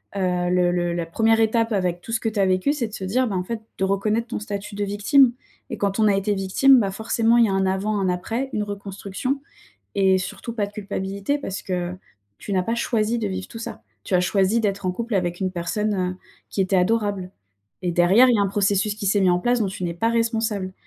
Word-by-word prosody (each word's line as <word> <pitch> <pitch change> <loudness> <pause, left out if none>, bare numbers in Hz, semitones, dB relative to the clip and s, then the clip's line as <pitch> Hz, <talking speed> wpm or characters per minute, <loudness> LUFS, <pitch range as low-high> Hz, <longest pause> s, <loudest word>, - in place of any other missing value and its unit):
heu, 180 -2 0
le 180 -1 +3
le 175 -1 0
la 170 -1 -2
1re 225 +7 +2
étape 225 +1 +2
avec 180 -3 0
tout 225 - -9
ce 225 - +1
que 225 - -1
tu 215 -1 -4
as 195 - +4
vécu 185 +9 +2
c'est 245 -6 -2
de 215 - -15
se 195 - -6
dire: 250 +7 +1
«Bah 200 - -3
en 180 - -1
fait» 225 +3 -5 0.2
de 190 - -1
reconnaître 210 +4 0
ton 240 - -4
statut 210 -1 -6
de 205 - -2
victime. 235 +6 +4 0.4
Et - - -3
quand 200 +1 -1
on 215 - +5
a 200 - +4
été 200 +1 0
victime, 200 +8 +4
bah, 200 -4 0
forcément 225 +3 +1
il 235 - +6
y - - +1
a - - 0
un 195 0 +1
avant 200 +2 0
un 190 -1 +1
après, 225 +9 -2
une 210 - 0
reconstruction. 205 +5 -4 0.6
Et 190 -1 +4
surtout 210 +5 -6
pas 215 -3 -1
de 200 - -13
culpabilité 200 +5 -3
parce 195 -9 -5
que, 180 -1 -3 0.4
tu 205 - -7
n'as 185 -1 +2
pas 230 +5 -1
choisi 235 -1 0
de 220 - -2
vivre 190 -1 -5
tout 225 - -9
ça. 225 - -7 0.2
Tu - - -8
as 180 - +5
choisi 195 +5 +2
d'être 200 -2 -1
en 180 - +1
couple 235 +4 -4
avec 175 -2 -1
une 190 -1 0
personne, 205 +4 -2
heu, 180 -1 -2 0.3
qui 195 - -2
était 190 0 +2
adorable 200 -1 0 0.5
et 175 - -1
derrière 185 +9 +5
il 240 - +4
y - - 0
a - - +3
un 200 - +2
processus 200 +1 +1
qui 210 -1 -5
s'est 200 +1 +3
mis 185 - +4
en 175 - +3
place 245 +3 +1
dont 210 - +2
tu 185 -1 -5
n'es 170 - -2
pas 225 +7 0
responsable. 225 -4 -1
200 Hz, 255 wpm, -23 LUFS, 185-225 Hz, 0.6 s, il